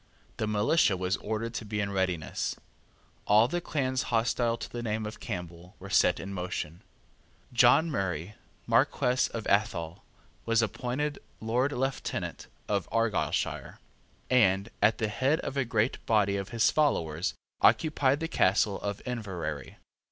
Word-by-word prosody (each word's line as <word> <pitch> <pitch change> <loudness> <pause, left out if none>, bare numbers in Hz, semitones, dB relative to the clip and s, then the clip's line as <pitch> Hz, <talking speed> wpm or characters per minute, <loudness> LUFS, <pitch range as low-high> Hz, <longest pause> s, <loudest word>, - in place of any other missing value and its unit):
The 110 - -1
militia 105 - +3
was 90 +1 0
ordered 110 +2 -3
to - - -4
be 105 0 -3
in 100 -1 -1
readiness. 95 -6 -1 0.7
All 105 +3 +6
the 175 +6 -2
clans 130 -5 -1
hostile 115 0 +1
to - - -6
the 120 - -6
name 110 -1 -2
of 105 - -7
Campbell 90 -3 -7
were 100 +1 -10
set 90 - +4
in 95 +3 -6
motion. 90 -3 -4 0.7
John 125 +7 +5
Murray, 95 - -2 0.3
Marquess 125 +1 +2
of 115 -2 -6
Athol, 85 -5 0 0.4
was 115 0 +2
appointed 125 +7 -2 0.2
Lord 125 +5 0
Lieutenant 135 -1 -3 0.2
of 100 -4 -1
Argyleshire, 115 -4 -1 0.5
and, 100 -4 +3
at 110 - +4
the 110 - 0
head 130 +9 +1
of - - -5
a 135 -2 +1
great 115 +1 0
body 105 -3 +3
of 100 -1 -3
his 115 -1 +3
followers, 85 - +1 0.3
occupied 145 -2 +3
the 165 - -1
castle 100 - +2
of 100 -1 -4
Inverary. 90 - -5
110 Hz, 145 wpm, -29 LUFS, 95-125 Hz, 0.7 s, All